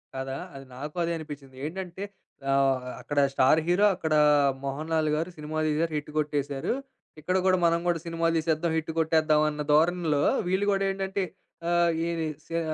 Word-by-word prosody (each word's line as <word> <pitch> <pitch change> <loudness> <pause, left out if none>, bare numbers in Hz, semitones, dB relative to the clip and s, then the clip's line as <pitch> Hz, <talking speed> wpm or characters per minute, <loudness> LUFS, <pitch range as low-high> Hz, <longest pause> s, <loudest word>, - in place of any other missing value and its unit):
కదా. 135 0 -4 0.2
అది 135 0 -9
నాకు 150 +5 -7
అదే 170 - -1
అనిపించింది. 145 -4 -9
ఏంటంటే 185 +3 -5 0.5
ఆహ్, 135 -1 +2 0.2
అక్కడ 145 -1 -1
స్టార్ 135 +3 +4
హీరో, 180 +4 +4
అక్కడ 160 -3 -2 0.5
'మోహన్లాల్' 155 +3 -1
గారు 165 +3 -2
సినిమా 150 +1 -5
తీశారు 160 +2 0
హిట్ 150 0 -6
కొట్టేసారు. 145 -1 -1 0.5
ఇక్కడ 180 +5 0
కూడా 185 -1 +4
మనం 170 0 +4
కూడా 170 -1 +1
సినిమాలు 165 -1 0
తీసేద్దాం, 160 +1 0
హిట్ 160 0 -2
కొట్టేద్దాం 155 -1 +3
అన్న 150 0 -4
ధోరణిలో 160 -1 +3 0.3
వీళ్ళు 190 +3 +1
కూడా 195 0 0
ఏంటంటే 195 0 -2 0.5
ఆహ్, 175 0 +3 0.2
ఏరి 165 -1 -1 0.2
స్యా 165 0 -2
160 Hz, 155 wpm, -27 LUFS, 150-170 Hz, 0.5 s, స్టార్